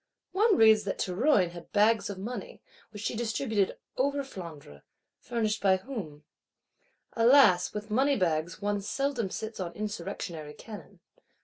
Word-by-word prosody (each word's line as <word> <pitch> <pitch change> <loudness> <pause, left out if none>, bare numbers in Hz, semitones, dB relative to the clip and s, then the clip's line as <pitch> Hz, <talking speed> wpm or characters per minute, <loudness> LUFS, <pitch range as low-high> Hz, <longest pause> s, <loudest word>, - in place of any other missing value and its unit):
One 410 +3 +3
reads 220 -1 +6
that 195 - -2
Théroigne 190 - +2
had 175 -1 -11
bags 215 0 +3
of 200 - -5
money, 245 - -6 0.3
which 210 -1 -9
she 230 - -2
distributed 220 -3 -1 0.2
over 280 +2 +1
Flandre:—furnished 190 - -6
by 190 -1 +4
whom? 185 - -7 0.9
Alas, 230 -6 +5
with 210 +1 -6
money 270 +5 +3
bags 170 -2 -1
one 205 0 -1
seldom 255 -1 -1
sits 220 +3 -6
on 175 -2 -4
insurrectionary 170 -6 -5
cannon. 215 -2 -11
210 Hz, 130 wpm, -29 LUFS, 185-240 Hz, 0.9 s, reads